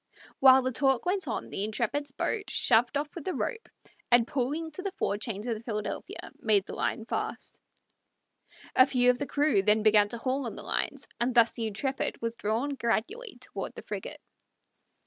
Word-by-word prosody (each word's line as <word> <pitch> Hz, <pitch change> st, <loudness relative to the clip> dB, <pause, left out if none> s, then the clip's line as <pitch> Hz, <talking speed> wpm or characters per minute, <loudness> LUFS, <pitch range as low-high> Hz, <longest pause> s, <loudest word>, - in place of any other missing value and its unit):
While 265 Hz, -1 st, +7 dB
the 255 Hz, -, 0 dB
talk 270 Hz, 0 st, +2 dB
went 380 Hz, +1 st, 0 dB
on -, -, -4 dB
the 195 Hz, -, -2 dB
Intrepid's 240 Hz, +7 st, -1 dB
boat 415 Hz, +8 st, -2 dB
shoved 240 Hz, +3 st, +3 dB
off 290 Hz, 0 st, -3 dB
with 340 Hz, -, -7 dB
the 370 Hz, -, -3 dB
rope, 460 Hz, -2 st, -3 dB, 0.4 s
and 240 Hz, -1 st, +5 dB
pulling 290 Hz, +5 st, -2 dB
to 345 Hz, -, -5 dB
the 395 Hz, 0 st, -3 dB
fore 205 Hz, -, -1 dB
chains 215 Hz, -1 st, -4 dB
of 240 Hz, -, 0 dB
the 220 Hz, -, -9 dB
Philadelphia, 210 Hz, -3 st, -5 dB
made 205 Hz, -3 st, +3 dB
the -, -, -8 dB
line 225 Hz, -, -2 dB
fast. -, -, -4 dB, 1.1 s
A 255 Hz, -, +7 dB
few 250 Hz, -2 st, +4 dB
of 245 Hz, -, -5 dB
the 285 Hz, -, -2 dB
crew 290 Hz, -8 st, +2 dB
then 210 Hz, +2 st, +3 dB
began 210 Hz, -1 st, +5 dB
to 235 Hz, -, -4 dB
haul 260 Hz, +2 st, -1 dB
on -, -, -6 dB
the -, -, -7 dB
lines, -, -, -2 dB
and 245 Hz, +1 st, 0 dB
thus 235 Hz, -1 st, +6 dB
the 225 Hz, -1 st, -2 dB
Intrepid 265 Hz, +6 st, -2 dB
was 230 Hz, 0 st, -3 dB
drawn 230 Hz, +5 st, -1 dB
gradually 270 Hz, -, -2 dB
toward -, -, -6 dB
the -, -, -9 dB
frigate. -, -, -6 dB
245 Hz, 190 wpm, -29 LUFS, 220-285 Hz, 1.1 s, While